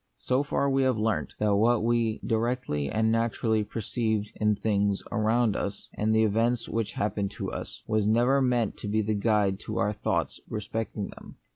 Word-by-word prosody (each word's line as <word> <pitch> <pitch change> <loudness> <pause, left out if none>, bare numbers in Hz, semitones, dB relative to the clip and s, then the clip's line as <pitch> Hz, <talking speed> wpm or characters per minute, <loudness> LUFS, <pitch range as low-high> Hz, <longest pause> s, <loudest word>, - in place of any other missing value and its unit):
So 125 - +1
far 140 -1 0
we 135 0 +2
have 130 -3 +2
learnt, 110 0 -1
that 105 -1 +2
what 115 +2 +3
we 115 -1 +1
directly 115 - -1
and 110 0 +1
naturally 115 -1 +1
perceive 110 -1 -2
in 105 -1 +1
the - - -21
things 100 -2 +1
around 110 0 +2
1 - - -2
us, 100 0 -6
and 110 +1 0
the 110 - +4
events 115 +3 +1
which 110 -1 -2
happen 100 -1 -1
to 100 -4 -3
us, - - -7
was 110 -2 +1
never 120 +5 +3
meant 125 -4 +1
to - - -6
be 110 +1 +1
the 110 +1 0
guide 100 -2 +1
to - - -5
our 105 +2 +1
thoughts 105 - -1
respecting 105 -1 -4
them. - - -12
110 Hz, 190 wpm, -27 LUFS, 105-115 Hz, -, the